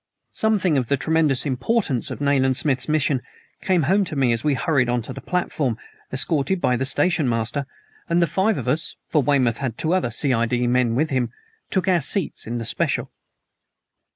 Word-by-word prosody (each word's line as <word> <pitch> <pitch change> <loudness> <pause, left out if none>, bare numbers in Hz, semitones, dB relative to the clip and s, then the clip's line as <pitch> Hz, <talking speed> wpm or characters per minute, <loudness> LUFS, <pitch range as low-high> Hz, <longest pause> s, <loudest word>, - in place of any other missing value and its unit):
Something 195 -9 +2
of 125 - -3
the 140 - +1
tremendous 155 -2 +1
importance 140 - 0
of - - -6
Nayland 135 -2 +2
Smith's 140 -1 0
mission 145 -3 +1 0.4
came 180 -4 +2
home 195 +8 +3
to 155 - -5
me 130 -4 +2
as 115 - -2
we 150 -2 +2
hurried 125 -1 +1
on 120 -1 0
to - - -6
the - - -8
platform, 150 -9 -1 0.3
escorted 150 +6 +1
by 125 - +2
the 130 +2 -1
station 145 -1 +1
master, 115 +4 -2 0.4
and 170 +1 +2
the 170 - +4
five 190 +6 +1
of - - -5
us 150 +6 -1
for 150 - +3
Weymouth 125 -4 +2
had 130 -5 -3
two 160 +2 0
other 185 -9 +1
C.I.D. 120 -1 0
men 120 -1 +2
with 155 +4 0
him 125 -3 0 0.4
took 190 -2 -1
our 180 -3 +3
seats 180 - -1
in 120 +1 -3
the 115 - -4
special. - - -1
140 Hz, 190 wpm, -22 LUFS, 125-165 Hz, 0.4 s, the